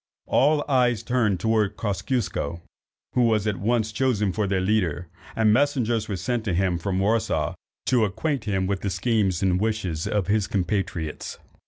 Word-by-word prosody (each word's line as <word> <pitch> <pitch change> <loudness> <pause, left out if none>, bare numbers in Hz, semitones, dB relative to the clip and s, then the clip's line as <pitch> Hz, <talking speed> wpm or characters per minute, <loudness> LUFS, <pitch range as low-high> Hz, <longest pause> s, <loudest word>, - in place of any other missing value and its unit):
All 145 +2 +3
eyes 125 -5 +2
were - - -26
turned 115 -7 +2
towards 110 0 +1
Kosciusko, 100 - -2 0.5
who 125 - +2
was 110 -3 +2
at 105 -3 0
once 110 +1 0
chosen 105 -5 +1
for 105 0 0
their 95 -1 +1
leader, 90 -5 0 0.3
and 110 -1 +4
messengers 120 -5 +1
were 100 - -1
sent 115 +6 -2
to 95 -5 0
him 90 -2 +1
from 95 +2 -2
Warsaw 110 +4 +1 0.3
to 125 -3 +3
acquaint 110 +6 -2
him 95 -3 0
with 100 0 -1
the 100 - -1
schemes 95 -1 0
and 90 0 +2
wishes 95 -8 -1
of 105 -3 0
his 105 +1 +1
compatriots. 90 -5 -2
105 Hz, 170 wpm, -25 LUFS, 95-115 Hz, 0.5 s, and